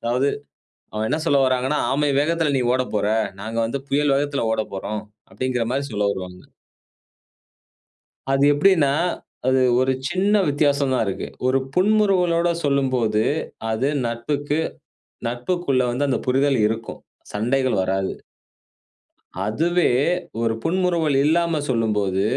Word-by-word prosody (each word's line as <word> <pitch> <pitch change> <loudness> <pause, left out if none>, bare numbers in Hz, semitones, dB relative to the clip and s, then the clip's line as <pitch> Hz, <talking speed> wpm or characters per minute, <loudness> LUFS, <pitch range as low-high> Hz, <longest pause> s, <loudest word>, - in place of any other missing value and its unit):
அதாவது 125 +4 +1 0.6
அவங்க 110 +1 -2
என்ன 155 - 0
சொல்ல 140 -4 +3
வராங்கன்னா, 130 +3 +1 0.2
"ஆமை 145 +1 +1
வேகத்தில 160 -1 +1
நீ - - +1
ஓட 130 - +2
போற. 105 - +1 0.3
நாங்க 110 +2 -5
வந்து 135 +4 -3
புயல் 145 0 +2
வேகத்தில 140 -3 -1
ஓட 110 - +1
போறோம்." 105 +2 -4 0.3
அப்டிங்கிற 125 +2 -1
மாரி 140 +2 -1
சொல்ல 105 -1 0
வருவாங்க. 90 -2 -7 1.9
அது 135 +1 +3
எப்டின்னா, 145 -2 +3 0.6
அது 130 0 +3 0.2
ஒரு 130 +1 +2 0.2
சின்ன 195 +3 +2
வித்தியாசம் 140 -2 +1
தான் 120 - +1
இருக்கு. 95 - -4 0.2
ஒரு 130 - +3 0.2
புன்முறுவலோட 185 -4 +3 0.2
சொல்லும்போது, 130 -6 +1 0.5
அது 130 +6 0 0.2
நட்புக்கு 145 +6 -2 0.7
நட்புக்குள்ள 130 +2 0
வந்து 140 +4 0
அந்த 130 -4 +1
புரிதல் 135 +1 +2
இருக்கும். 115 0 -5 0.3
சண்டைகள் 125 +2 0
வராது. 95 0 -1 1.3
அதுவே 170 +10 +1 0.5
ஒரு 115 -1 +1
புன்முறுவல் 170 -4 +1
இல்லாம 165 0 +2
சொல்லும்போது, 105 -5 0
135 Hz, 120 wpm, -22 LUFS, 115-150 Hz, 1.9 s, சொல்ல